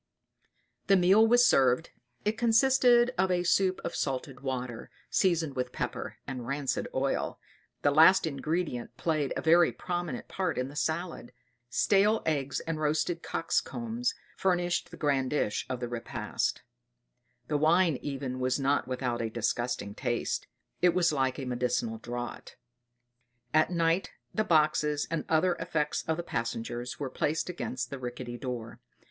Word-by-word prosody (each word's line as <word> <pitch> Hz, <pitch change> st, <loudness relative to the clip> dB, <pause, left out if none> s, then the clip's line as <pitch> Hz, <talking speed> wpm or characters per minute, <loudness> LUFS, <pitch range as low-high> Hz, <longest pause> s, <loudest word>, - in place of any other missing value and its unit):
The 195 Hz, -, +6 dB
meal 195 Hz, +5 st, +6 dB
was 245 Hz, +2 st, +6 dB
served. 130 Hz, -, +3 dB, 0.3 s
It 210 Hz, +1 st, +1 dB
consisted 240 Hz, +1 st, +4 dB
of 190 Hz, 0 st, +3 dB
a 180 Hz, -1 st, +1 dB
soup 185 Hz, +1 st, +2 dB
of -, -, -3 dB
salted 135 Hz, -1 st, -3 dB
water, 125 Hz, -3 st, -4 dB, 0.2 s
seasoned 165 Hz, -6 st, +1 dB
with 125 Hz, -1 st, -2 dB
pepper -, -, -4 dB
and 125 Hz, -3 st, -6 dB
rancid 140 Hz, -1 st, -1 dB
oil. 135 Hz, +1 st, -1 dB, 0.4 s
The 145 Hz, -, +4 dB
last 160 Hz, +6 st, +6 dB
ingredient 150 Hz, -5 st, -3 dB
played 150 Hz, -1 st, 0 dB
a -, -, -3 dB
very 170 Hz, +1 st, +5 dB
prominent 175 Hz, -2 st, -4 dB
part 185 Hz, -3 st, -2 dB
in 125 Hz, +1 st, -1 dB
the 145 Hz, -, -12 dB
salad; 160 Hz, -4 st, -3 dB, 0.4 s
stale 205 Hz, -, +3 dB
eggs 140 Hz, -3 st, -1 dB
and 165 Hz, -1 st, -3 dB
roasted 155 Hz, +3 st, 0 dB
cocks' -, -, 0 dB
combs 235 Hz, +1 st, -3 dB, 0.2 s
furnished 175 Hz, -2 st, 0 dB
the 170 Hz, -, -11 dB
grand 140 Hz, -4 st, +1 dB
dish 125 Hz, -8 st, -1 dB
of 130 Hz, -1 st, -3 dB
the 120 Hz, -, -3 dB
repast; 120 Hz, -1 st, -3 dB, 0.8 s
the 150 Hz, -, -1 dB
wine 160 Hz, 0 st, +3 dB
even 135 Hz, -3 st, -4 dB
was 130 Hz, +2 st, 0 dB
not 140 Hz, +1 st, +1 dB
without 125 Hz, -2 st, -2 dB
a 115 Hz, -, -1 dB
disgusting 120 Hz, -2 st, -2 dB
taste 120 Hz, +1 st, -2 dB, 0.3 s
it 175 Hz, -1 st, +4 dB
was 175 Hz, -3 st, +3 dB
like 130 Hz, -2 st, 0 dB
a 135 Hz, -, -4 dB
medicinal 120 Hz, -2 st, -1 dB
draught. 120 Hz, +1 st, -6 dB, 1.0 s
At 155 Hz, 0 st, +4 dB
night 170 Hz, +1 st, +1 dB, 0.2 s
the 215 Hz, -, +1 dB
boxes 150 Hz, -4 st, +2 dB
and 165 Hz, -2 st, -1 dB
other 170 Hz, +3 st, +3 dB
effects 155 Hz, -3 st, -1 dB
of 160 Hz, -1 st, 0 dB
the 175 Hz, -, -3 dB
passengers 120 Hz, -3 st, -4 dB
were 140 Hz, -3 st, -3 dB
placed 155 Hz, +6 st, -1 dB
against 130 Hz, -8 st, -4 dB
the 140 Hz, -, -5 dB
rickety 120 Hz, -1 st, -6 dB
doors. 125 Hz, -4 st, -5 dB
150 Hz, 150 wpm, -29 LUFS, 125-175 Hz, 1.0 s, The